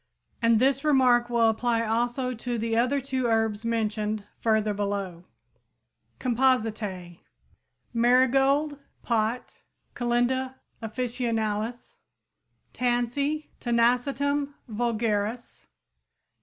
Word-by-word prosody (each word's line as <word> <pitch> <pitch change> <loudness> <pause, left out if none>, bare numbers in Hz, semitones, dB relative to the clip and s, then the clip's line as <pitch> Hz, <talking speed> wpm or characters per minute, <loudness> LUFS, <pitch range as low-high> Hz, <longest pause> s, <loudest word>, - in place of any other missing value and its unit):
And 230 -1 +4
this 270 +4 +2
remark 250 -5 +4
will 235 -1 +3
apply 230 +1 +1
also 240 +3 -1
to 240 +1 -4
the 225 0 -1
other 250 +5 +2
two 260 -2 -2
herbs 225 -1 0
mentioned 215 -2 -1
further 220 -2 +1
below. 200 -4 -3 0.9
COMPOSITÆ 220 -8 0 0.7
Marigold, 270 +5 +3 0.2
Pot 230 +1 -1 0.3
(Calendula 250 +2 0 0.3
officinalis, 230 -1 -3
Linn.). - - -48
Tansy 250 +5 -1
(Tanacetum 275 +4 +1
vulgaris, 225 0 -2
Linn.). - - -47
240 Hz, 90 wpm, -26 LUFS, 220-255 Hz, 0.9 s, And